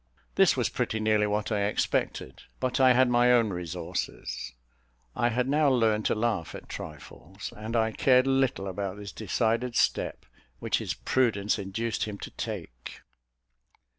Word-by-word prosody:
This - - +4
was - - +2
pretty 110 - -2
nearly 110 -1 +2
what 105 +1 -1
I 100 -1 +1
expected; 100 -9 -1 0.2
but 130 0 -1
I 130 -1 +7
had 130 +1 +4
my 120 0 +4
own 115 -3 +4
resources. 85 -7 -4 0.6
I 120 - +2
had 125 +2 0
now 145 +1 +3
learned 110 -4 +2
to - - +1
laugh 105 -7 -1
at - - -10
trifles, 80 +4 -9
and 110 +2 -5
I 110 -1 +2
cared 130 +3 +4
little 135 -6 +1
about 95 +1 -4
this 100 -1 -7
decided 115 +3 -1
step - - 0 0.3
which - - 0
his - - -3
prudence 110 -4 +1
induced 110 +4 -2
him 105 -2 -6
to - - -8
take. 60 0 -7
110 Hz, 155 wpm, -28 LUFS, 100-120 Hz, 0.6 s, I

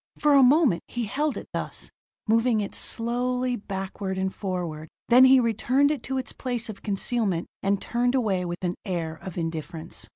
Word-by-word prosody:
For 295 -1 +3
a 280 - +7
moment 260 - +5
he 240 -1 -3
held 290 +7 -1
it - - -7
thus, - - -5 0.4
moving 230 +1 +3
it 205 - -3
slowly 250 +2 0
backward 195 -2 -5
and 190 0 -1
forward: 175 -5 -4 0.2
then 250 +2 +8
he 260 0 +7
returned 250 +5 +2
it 300 - -2
to 265 - -1
its 260 - -3
place 245 -3 -4
of 205 - -8
concealment, 200 -3 -1 0.2
and 200 0 +1
turned 245 +2 0
away 205 -8 +1
with 175 +1 -5
an 175 -1 0
air 165 -5 -3
of 185 -2 -8
indifference. 165 0 -5
220 Hz, 175 wpm, -26 LUFS, 185-250 Hz, 0.4 s, then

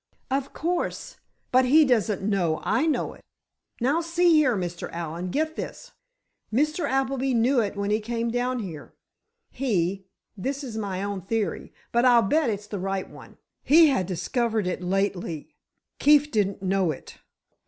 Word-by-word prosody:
"Of 275 0 -1
course; 350 +3 -3 0.3
but 255 +1 +5
he 305 +5 +6
doesn't 220 -6 +1
know 185 -6 +1
I 320 - +1
know 310 - 0
it. - - -17 0.6
Now, 280 +8 +2
see 340 +1 +2
here, 280 -8 +4
Mr. 175 -2 -4
Allen, 170 +2 -4
get 315 - -1
this. - - -7 0.6
Mr. 305 +8 +1
Appleby 270 -1 0
knew 245 +3 +3
it 205 -3 -1
when 200 0 -2
he 215 - +2
came 230 +1 -2
down 250 +1 -1
here. 160 -6 -9 0.6
He—this 200 - -3
is 240 -5 -6
only 215 -2 -3
my 190 0 -3
own 200 -1 -3
theory, 215 +2 -2 0.2
but 235 +1 +2
I'll 240 -2 +6
bet 295 +6 +2
it's 205 -1 -3
the 205 -1 -5
right 195 0 -2
one—he 320 +2 +2
had 225 -10 0
discovered 220 +4 -1
it 180 0 -2
lately; 180 -4 -2 0.5
Keefe 295 0 +5
didn't 200 -2 0
know 190 -2 +1
it. 150 - -7
225 Hz, 155 wpm, -25 LUFS, 195-270 Hz, 0.6 s, he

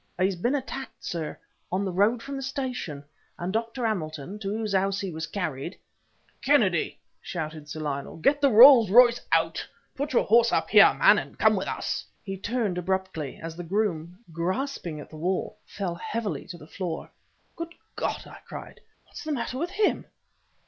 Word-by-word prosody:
"He's 190 +1 +2
been 240 +11 0
attacked, 270 -1 -6
sir, 165 -3 -4 0.3
on 190 +2 0
the 190 - -2
road 210 +6 +2
from 275 +2 -5
the 270 - -4
station, 255 - -4 0.3
and 180 +2 -3
Dr. 230 +2 -2
Hamilton, 175 -2 -3
to 195 -2 -4
whose 215 0 -2
house 195 +1 +1
he 195 -2 -3
was 160 0 -4
carried 155 -10 -4 0.3
" - - -38
"Kennedy!" - - +2 0.2
shouted 155 -3 -5
Sir 155 +2 -5
Lionel, 140 -1 -4
"get 280 - +2
the 280 - +5
Rolls 235 -1 +9
Royce 240 +3 +6
out! - - +2 0.3
Put 285 +1 -3
your - - +4
horse 230 +2 +5
up - - 0
here, - - +9
my - - +7
man, - - +1
and - - -9
come - - +4
with - - -2
us!" - - -2 0.2
He 195 -3 -4
turned 205 -2 -1
abruptly... 185 -5 -3
as 165 0 -5
the 175 - -6
groom, 175 -2 -1 0.2
grasping 175 - -2
at 145 - -11
the 155 - -9
wall, 180 +4 -2
fell 190 -4 -3
heavily 200 -2 -4
to 175 - -8
the 150 - -13
floor. 170 0 -5 0.4
"Good 335 0 -6 0.2
God!" - - -2
I - - -12
cried - - -9 0.2
"What's - - -10
the 310 - -3
matter 255 -1 -2
with 340 +3 -1
him?" 405 +2 +1
195 Hz, 185 wpm, -27 LUFS, 170-245 Hz, 0.4 s, Rolls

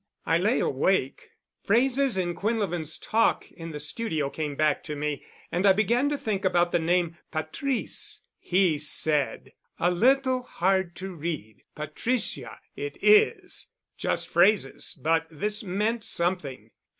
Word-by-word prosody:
I - - +2
lay - - +2
awake. - - 0 0.3
Phrases 255 +2 +2
in 175 -2 0
Quinlevin's 185 -7 -2
talk 225 +1 +1
in 165 -1 -9
the 150 -2 -6
studio 150 -3 -2
came 150 -2 -4
back 150 0 +1
to 150 - -4
me 150 0 -3 0.3
and 175 +2 0
I 195 -1 +6
began 235 +7 +2
to 290 - -1
think 210 -6 -2
about 175 -2 +2
the - - +2
name 170 0 0
'Patrice'—he 180 - -1
said, 150 -1 +1 0.2
'a 175 - +2
little 255 +6 +3
hard 190 -5 0
to 190 0 -6
read. 150 -10 -5
Patricia 155 - -3 0.2
it 430 - -5
is.' 425 +1 +4 0.3
Just - - -2
phrases, 205 -10 +2
but 160 +1 +1
this 210 +7 -3
meant 210 +4 -1
something. 170 -6 0
180 Hz, 135 wpm, -26 LUFS, 155-225 Hz, 0.3 s, I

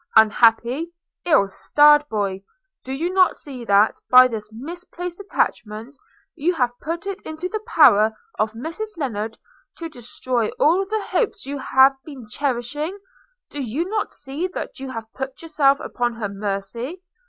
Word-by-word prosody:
– - - -26
Unhappy, 235 +8 +4 0.3
ill 300 - +4
starred 295 +8 +4
boy! 200 -3 -2 0.4
Do 260 - -7
you 330 +7 -2
not 375 -1 +4
see 260 -4 -7
that, 205 +1 +4
by 255 0 +9
this 215 -3 -6
misplaced 345 - -7
attachment, 230 - -2 0.4
you 345 +5 0
have 245 -4 -1
put 330 +3 -4
it 395 0 -5
into 315 +3 -5
the 430 +2 -4
power 220 - +6 0.3
of 215 0 +1
Mrs 335 - -6
Lennard 225 -7 -3 0.4
to 330 -1 -6
destroy 245 -3 -2
all 355 +6 +3
the 430 0 -2
hopes 460 - 0
you 280 +1 -4
have 265 +1 +5
been 270 -7 -10
cherishing? 285 - -3 0.5
Do 290 - -4
you 270 +8 -2
not 425 0 -1
see 290 +6 -4
that - - -5
you 270 0 -6
have 225 -3 -6
put 265 +1 -6
yourself 285 -4 +3
upon 240 -1 -2
her 215 -3 -3
mercy? 205 - -4
270 Hz, 155 wpm, -22 LUFS, 225-330 Hz, 0.5 s, by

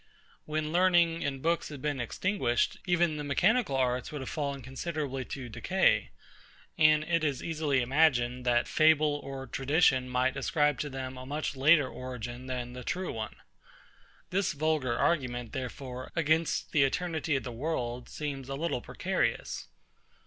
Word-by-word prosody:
When 155 0 -2
learning 175 -2 +3
and 135 -2 -3
books 165 0 +1
had 145 -2 -8
been 145 0 -2
extinguished, 120 - 0
even 175 -3 +2
the 150 - -4
mechanical 180 - +2
arts 125 -1 0
would 150 -2 -5
have 130 - -5
fallen 140 -3 -3
considerably 135 0 -3
to 130 -3 -6
decay; 110 - +2 0.7
and 155 -1 +5
it 165 0 0
is 145 -4 -1
easily 150 -5 0
imagined, 125 -3 +2
that 120 -1 +2
fable 155 -2 +3
or 135 -1 -6
tradition 135 0 +2
might 125 +1 +1
ascribe 145 +1 +1
to 145 - -2
them 130 -1 -6
a 130 - -8
much 145 0 -3
later 145 +1 +5
origin 125 -1 -7
than 125 -1 -4
the 125 0 -7
true 185 +6 -2
one. 110 -1 -5 1.0
This 195 -1 +1
vulgar 145 -5 0
argument, 120 -7 0
therefore, 130 -1 -6
against 160 0 +1
the 150 - +3
eternity 160 +2 0
of 135 - -1
the 125 - -5
world, 125 -2 -3
seems 140 -3 -5
a 135 - -2
little 145 -4 -2
precarious. - - -2
140 Hz, 155 wpm, -30 LUFS, 130-155 Hz, 1.0 s, and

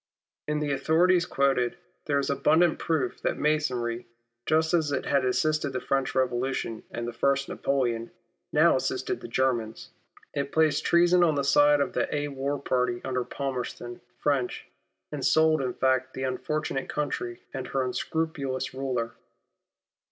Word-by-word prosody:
In 150 0 0
the 145 -1 -1
authorities 170 +6 +3
I - - -16
have - - -14
quoted 135 -3 +2
for - - -22
you, - - -31 0.2
there 140 - +1
is 140 - -1
abundant 160 +4 +3
proof 150 -7 -1
that - - -1
Masonry, 125 -6 0 0.4
just 160 +1 +2
as 160 -4 +2
it 140 - -1
had 140 -2 +2
assisted 145 +2 +1
the 130 - -1
French 135 0 -1
Eevolution 130 -3 -1
and 120 0 -4
Napoleon 125 -1 0
I., - - -29 0.4
now - - +5
assisted - - -2
the - - -7
Germans. 120 -2 -1 0.4
It 140 -1 -2
placed 160 -2 +2
treason 175 +1 +5
on 160 -3 +3
the 140 - 0
side 145 +1 +5
of 140 - -1
the - - 0 2.1
French, 140 -4 -1 0.4
and - - -4
sold 160 -1 +4
in 125 -2 -2
fact 130 0 +1
the 130 - -4
unfortunate 135 +1 -2
country 135 -5 -3
and 130 -1 -4
her 135 0 0
unscrupulous 140 0 -2
ruler. 130 -3 -2
140 Hz, 145 wpm, -27 LUFS, 130-155 Hz, 2.1 s, now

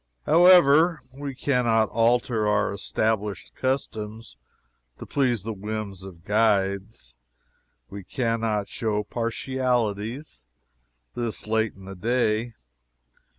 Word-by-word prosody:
However, 165 -1 +6
we 140 0 -6
can 125 -2 0
not 110 -1 +3
alter 115 -1 +1
our 105 -1 +1
established 105 -1 -2
customs 115 - -3 0.6
to - - -9
please 125 -7 0
the 110 +1 -4
whims 105 -1 -5
of 90 -3 -12
guides; 100 - 0 0.7
we 100 +6 -9
can 115 +2 -2
not 105 -3 -1
show 105 -3 -2
partialities 120 - -2 0.7
this 120 -2 -3
late 110 0 0
in 95 0 -14
the 95 - -8
day. 115 +2 0
110 Hz, 110 wpm, -25 LUFS, 105-125 Hz, 0.7 s, However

